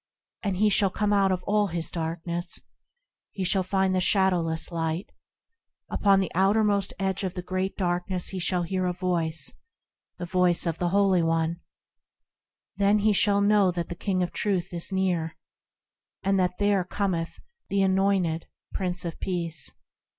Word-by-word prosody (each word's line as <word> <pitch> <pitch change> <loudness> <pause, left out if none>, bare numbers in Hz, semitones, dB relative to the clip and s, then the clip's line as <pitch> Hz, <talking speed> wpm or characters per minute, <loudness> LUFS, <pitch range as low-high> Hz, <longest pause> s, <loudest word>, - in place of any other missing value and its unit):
And 195 -3 -1
he 210 +2 +4
shall 200 -1 +3
come 210 +2 0
out 195 -1 +3
of 180 -1 -1
all 210 0 +2
his 170 -2 -3
darkness, 170 +1 -3 0.7
He 195 - -4
shall 190 +1 +2
find 190 0 +1
the 185 - +2
Shadowless 180 -4 +1
Light. 165 +2 -2 0.8
Upon 200 -1 +4
the 190 - -1
outermost 200 +1 +2
edge 195 +1 -1
of 185 -1 -3
the 180 - -4
Great 185 +1 -2
Darkness 180 0 -1
he 190 - -4
shall 180 0 0
hear 185 +1 -1
a 180 - 0
Voice, 170 -4 -1 0.6
The 175 - -4
Voice 180 0 +2
of 165 -1 -2
the 175 - +1
Holy 195 -1 +3
One, 165 +1 0 1.2
Then 205 +1 +3
shall 200 0 +3
he 200 - +3
know 205 -2 +4
that 170 -2 -3
the - - -3
King 185 0 -1
of 175 - -3
Truth 190 -4 -1
is 170 +2 -2
near, 175 -4 -1 0.9
And 195 0 +2
that 180 -1 0
there 205 -2 +2
cometh 180 -3 -2 0.3
the 200 0 +2
anointed 190 -4 +1 0.3
Prince 180 -1 -2
of 170 - -5
Peace. 170 -6 -1
185 Hz, 160 wpm, -26 LUFS, 170-195 Hz, 1.2 s, he